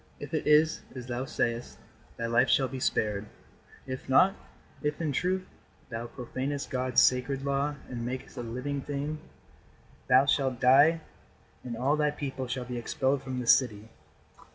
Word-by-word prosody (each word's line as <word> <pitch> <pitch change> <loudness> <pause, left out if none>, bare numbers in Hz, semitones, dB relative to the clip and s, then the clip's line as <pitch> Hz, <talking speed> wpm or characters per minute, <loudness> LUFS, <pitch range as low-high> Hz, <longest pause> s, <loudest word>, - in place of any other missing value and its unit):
If 145 +1 -8
it 155 - -1
is 155 +1 +4
as 125 -1 -6
thou 125 +1 -3
sayest, 115 -2 -2 0.4
thy 115 - -3
life 120 +2 +3
shall 135 - +4
be 130 +1 -6
spared. 105 -3 0 0.6
If 130 0 -6
not 185 +9 +6 0.5
if, 150 0 -2
in 160 -3 -1
truth, 185 +6 0 0.4
thou 115 0 -5
profanest 130 +4 -4
God's 130 -1 +2
sacred 130 +2 +2
law 140 +1 0
and 120 -2 -5
makest 125 +2 -5
a 125 - -4
living 125 +4 -4
thing, 145 +2 -4 0.9
thou 130 +2 +6
shalt 135 -3 +1
die 145 +6 +6 0.6
and 120 -2 -5
all 135 +5 +2
thy 150 0 +2
people 135 -3 -4
shall 125 0 -3
be 125 -1 -4
expelled 130 +3 0
from 130 -1 -4
this 120 - +7
city." 110 -4 -3
130 Hz, 160 wpm, -29 LUFS, 125-145 Hz, 0.9 s, this